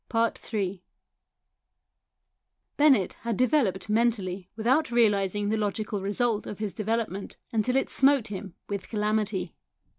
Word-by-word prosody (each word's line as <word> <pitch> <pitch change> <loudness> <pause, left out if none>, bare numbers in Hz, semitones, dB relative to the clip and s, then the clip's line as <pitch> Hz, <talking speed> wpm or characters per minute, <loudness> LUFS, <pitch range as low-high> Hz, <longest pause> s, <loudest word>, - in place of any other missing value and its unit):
Ill 210 -4 -1 2.0
Bennett 270 -10 +4
had 230 -3 -2
developed 250 -9 +2
mentally 210 -5 0
without 245 +8 +2
realising 205 -3 +2
the 220 - +1
logical 210 -1 -2
result 215 +2 0
of 205 - -6
his 210 -2 -3
development 215 -2 -3
until 230 +2 +1
it 270 - +2
smote 270 -4 +3
him 195 -3 -7
with 200 -2 -5
calamity. 210 -4 -1
215 Hz, 115 wpm, -27 LUFS, 200-235 Hz, 2.0 s, Bennett